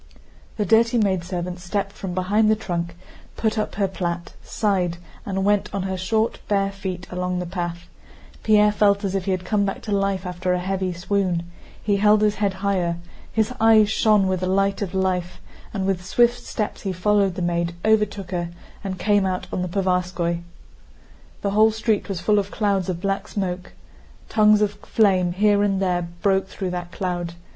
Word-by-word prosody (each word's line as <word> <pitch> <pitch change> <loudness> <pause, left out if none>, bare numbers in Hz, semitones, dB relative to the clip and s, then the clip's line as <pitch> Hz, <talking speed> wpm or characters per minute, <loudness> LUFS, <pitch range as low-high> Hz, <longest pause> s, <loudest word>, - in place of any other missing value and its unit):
The 210 - 0
dirty 230 +3 +4
maidservant 180 -3 -1
stepped 195 +2 -2
from 190 -3 -6
behind 205 +4 +2
the 215 - +5
trunk, 170 -5 -3 0.4
put 220 -1 0
up 215 - -2
her 200 -1 +1
plait, 175 -2 -4
sighed, 185 -6 0 0.3
and 190 -1 -1
went 205 0 +2
on 195 - -1
her 190 0 -2
short, 220 +5 0
bare 195 -1 +1
feet 190 -2 -5
along 180 0 -2
the 180 - -2
path. 175 -1 -4 0.5
Pierre 210 -1 +5
felt 205 0 +3
as 195 -1 -1
if 195 -2 -1
he 195 - 0
had 185 -1 -2
come 205 +1 +1
back 195 -1 -3
to 215 - -5
life 195 -1 0
after 180 0 -1
a 180 - 0
heavy 190 0 -1
swoon. 180 0 -1 0.4
He 205 -1 +2
held 210 +1 +4
his 210 -1 +3
head 200 -2 +1
higher, 180 -4 +1 0.3
his 220 +2 0
eyes 220 -2 +6
shone 215 -3 +4
with 185 -1 0
the 185 - -2
light 195 +2 +1
of 190 -2 -3
life, 185 -2 -1 0.3
and 195 -3 -2
with 190 -2 0
swift 240 +5 +2
steps 215 -3 -3
he 195 - -2
followed 195 0 +2
the 180 - -3
maid, 170 0 -1
overtook 210 -3 +1
her, 175 -2 -2 0.3
and 190 -1 -4
came 205 -1 +2
out 185 -1 -1
on - - -1
the 180 - -1
Povarskóy. 180 -2 0 1.0
The 200 - 0
whole 215 +2 +5
street 220 -1 -1
was 190 -3 -2
full 210 -1 +3
of 200 0 -3
clouds 200 -4 0
of 175 -2 -3
black 195 0 -1
smoke. 185 -3 -4 0.6
Tongues 210 -1 +5
of 205 - +1
flame 185 -5 +2
here 205 +2 +3
and 200 -2 +1
there 180 -2 0 0.2
broke 195 -1 +2
through 190 -1 -4
that 175 -1 -5
cloud. 175 -3 -3
195 Hz, 185 wpm, -23 LUFS, 180-205 Hz, 1.0 s, eyes